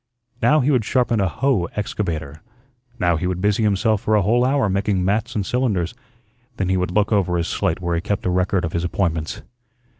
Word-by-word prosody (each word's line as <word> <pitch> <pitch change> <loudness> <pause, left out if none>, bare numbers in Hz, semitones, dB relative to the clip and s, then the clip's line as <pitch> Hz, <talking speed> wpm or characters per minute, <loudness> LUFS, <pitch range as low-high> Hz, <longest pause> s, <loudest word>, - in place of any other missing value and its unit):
Now 150 0 +4
he 140 +4 +2
would 125 -5 +2
sharpen 120 -1 +1
a 95 - +2
"hoe" 130 -3 +1
excavator, 80 -8 -3 0.6
now 85 -7 +2
he 90 +3 -2
would 90 -1 -2
busy 105 +3 +1
himself 105 0 +2
for 110 - +1
a 105 - +3
whole 120 +5 +3
hour 135 -2 +2
making 95 -1 0
"mats" 110 +5 0
and 100 -3 -1
"cylinders." 105 -8 0 0.6
Then 95 -2 -1
he 95 - +2
would 90 -1 -1
look 105 +4 +1
over 95 -4 +2
his 85 0 -1
slate 85 +3 -1
where 85 -1 -1
he 85 - 0
kept 100 +2 -3
a 90 - +1
record 90 0 +1
of 80 - -5
his 85 - -1
appointments. 85 -3 -2
100 Hz, 210 wpm, -21 LUFS, 90-110 Hz, 0.6 s, Now